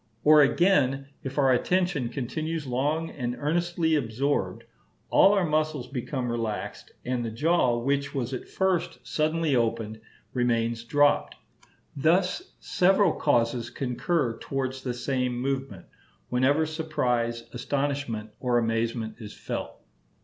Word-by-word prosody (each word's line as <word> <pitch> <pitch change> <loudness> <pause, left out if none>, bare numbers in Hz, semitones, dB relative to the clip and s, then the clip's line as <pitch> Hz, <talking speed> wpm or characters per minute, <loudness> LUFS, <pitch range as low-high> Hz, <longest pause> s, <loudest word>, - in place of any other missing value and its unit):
Or 150 0 +7
again, 140 -4 +3
if 135 +1 -6
our 135 -2 +4
attention 175 -1 +1
continues 155 +6 -3
long 145 +6 -1
and 125 -3 -3
earnestly 170 +1 0
absorbed, 140 0 0 0.5
all 195 - +6
our 195 -3 +2
muscles 155 -3 0
become 125 -1 -3
relaxed, 115 -3 -4
and 125 -1 -1
the 115 - -2
jaw, 130 0 +2
which 140 +4 -1
was 130 -1 -2
at 130 - -5
first 175 -4 0
suddenly 155 +4 0
opened, 115 -2 -1 0.3
remains 115 -2 0
dropped. 145 +4 +2 0.6
Thus 180 - +1
several 190 -1 +3
causes 120 -3 +1
concur 125 0 -1
towards 130 -1 -3
this 125 -1 -4
same 125 -2 0
movement, 135 -7 -3 0.4
whenever 135 +5 +3
surprise, 125 -7 -1
astonishment, 135 -4 -2
or 125 -2 +1
amazement 115 -1 -1
is 105 -3 -9
felt. - - -6
135 Hz, 120 wpm, -27 LUFS, 120-155 Hz, 0.6 s, Or